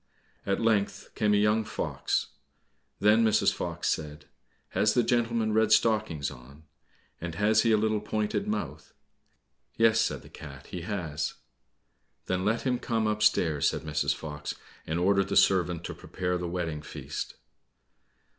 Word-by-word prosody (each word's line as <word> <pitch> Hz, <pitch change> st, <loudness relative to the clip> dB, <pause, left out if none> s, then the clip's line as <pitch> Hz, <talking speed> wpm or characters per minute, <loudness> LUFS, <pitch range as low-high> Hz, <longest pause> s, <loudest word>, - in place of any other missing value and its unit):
At 100 Hz, -, +1 dB
length 110 Hz, -3 st, 0 dB
came 105 Hz, -1 st, +2 dB
a -, -, +4 dB
young 105 Hz, +2 st, +3 dB
fox. -, -, -2 dB, 0.7 s
Then 105 Hz, +3 st, +5 dB
Mrs. 110 Hz, -1 st, +3 dB
Fox -, -, -3 dB
said, 75 Hz, -1 st, -3 dB, 0.4 s
"Has 105 Hz, -, +2 dB
the 120 Hz, -, +4 dB
gentleman 115 Hz, -2 st, +1 dB
red 110 Hz, 0 st, +3 dB
stockings 105 Hz, -, +2 dB
on, 70 Hz, +4 st, -14 dB, 0.6 s
and 85 Hz, -1 st, -5 dB
has 110 Hz, +3 st, +3 dB
he 115 Hz, -, +2 dB
a 110 Hz, -, +5 dB
little 110 Hz, 0 st, +1 dB
pointed 105 Hz, 0 st, -2 dB
mouth?" 105 Hz, 0 st, -4 dB, 0.8 s
"Yes," 115 Hz, 0 st, +4 dB
said -, -, -1 dB
the -, -, -14 dB
cat, 70 Hz, -1 st, -11 dB
"he 90 Hz, -, -6 dB
has." 80 Hz, -6 st, -3 dB, 0.9 s
"Then 95 Hz, 0 st, -1 dB
let 110 Hz, +3 st, 0 dB
him 125 Hz, -2 st, 0 dB
come 115 Hz, -2 st, -1 dB
upstairs," 105 Hz, -8 st, +2 dB
said -, -, -1 dB
Mrs. 75 Hz, -1 st, 0 dB
Fox, 75 Hz, -2 st, -6 dB, 0.3 s
and 80 Hz, -, -1 dB
ordered 100 Hz, +2 st, +3 dB
the -, -, -2 dB
servant 90 Hz, -3 st, +3 dB
to -, -, -5 dB
prepare 90 Hz, -1 st, -3 dB
the 90 Hz, -, -3 dB
wedding 80 Hz, -4 st, -3 dB
feast. -, -, -6 dB
105 Hz, 150 wpm, -28 LUFS, 80-110 Hz, 0.9 s, Then